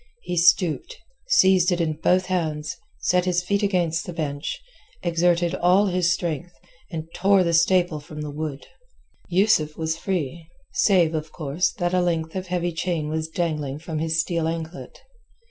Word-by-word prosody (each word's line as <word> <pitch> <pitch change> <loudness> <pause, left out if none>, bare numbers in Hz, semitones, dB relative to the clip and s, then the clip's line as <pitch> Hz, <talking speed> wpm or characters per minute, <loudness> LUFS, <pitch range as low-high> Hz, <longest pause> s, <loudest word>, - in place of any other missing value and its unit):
He - - -3
stooped, 175 - +3 0.3
seized 190 - +5
it 175 - +1
in 160 -2 +1
both 185 +1 +3
hands, 155 -5 -2 0.3
set 180 +1 +2
his 180 -1 +1
feet 200 +3 0
against 175 -5 +1
the 175 - -5
bench, 145 - -3 0.4
exerted 175 0 +2
all 185 +3 +4
his 180 -2 +1
strength, 175 -1 -2 0.4
and 160 -2 -5
tore 195 +1 +4
the 170 -1 0
staple 170 -1 +3
from 150 +1 -9
the 150 -1 -5
wood. 150 -1 -5 0.6
Yusuf 175 -5 +2
was 160 0 -2
free, 170 -3 -3 0.2
save, 175 -6 +3
of 155 0 -3
course, 155 +2 -1
that 175 -2 -2
a 180 - +3
length 165 -2 -1
of 185 0 -4
heavy 175 -1 -1
chain 160 -2 -2
was 160 0 -2
dangling 155 -5 -2
from 155 0 -5
his 160 0 0
steel 165 0 0
anklet. 165 +1 -6
170 Hz, 165 wpm, -24 LUFS, 160-180 Hz, 0.6 s, seized